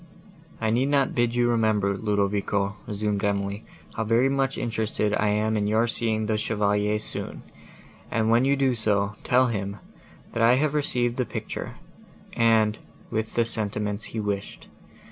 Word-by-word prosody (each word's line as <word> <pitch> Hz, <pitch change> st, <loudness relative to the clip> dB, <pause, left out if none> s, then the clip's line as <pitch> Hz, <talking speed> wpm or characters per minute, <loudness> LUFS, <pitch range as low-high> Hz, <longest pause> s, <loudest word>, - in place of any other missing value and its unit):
"I 110 Hz, -1 st, 0 dB
need 125 Hz, +4 st, +2 dB
not 140 Hz, -2 st, +2 dB
bid 120 Hz, -1 st, +1 dB
you 120 Hz, 0 st, +3 dB
remember, 110 Hz, -4 st, +2 dB
Ludovico," 100 Hz, -1 st, 0 dB
resumed 105 Hz, -1 st, -2 dB
Emily, 100 Hz, 0 st, -1 dB, 0.3 s
"how 110 Hz, -, -2 dB
very 115 Hz, +4 st, +3 dB
much 135 Hz, 0 st, 0 dB
interested 110 Hz, -2 st, -1 dB
I 105 Hz, 0 st, +1 dB
am 105 Hz, +1 st, +1 dB
in 105 Hz, -1 st, 0 dB
your 110 Hz, +2 st, +3 dB
seeing 110 Hz, -2 st, 0 dB
the 105 Hz, 0 st, 0 dB
Chevalier 105 Hz, -1 st, +1 dB
soon; 105 Hz, -, -4 dB, 0.7 s
and, 110 Hz, 0 st, +1 dB
when 120 Hz, +2 st, +4 dB
you 140 Hz, +1 st, +3 dB
do 135 Hz, -2 st, +2 dB
so, 105 Hz, -3 st, 0 dB
tell 130 Hz, +1 st, +4 dB
him, 100 Hz, -2 st, -3 dB, 0.6 s
that 115 Hz, -, -1 dB
I 115 Hz, +2 st, +6 dB
have 145 Hz, +2 st, +1 dB
received 125 Hz, -5 st, 0 dB
the 125 Hz, -, +1 dB
picture, -, -, -5 dB, 0.6 s
and, 110 Hz, -2 st, +3 dB, 0.3 s
with 110 Hz, 0 st, -2 dB
the 115 Hz, -, +3 dB
sentiments 105 Hz, -1 st, -3 dB
he 115 Hz, -, -5 dB
wished. 100 Hz, -2 st, -4 dB
110 Hz, 160 wpm, -25 LUFS, 105-120 Hz, 0.7 s, I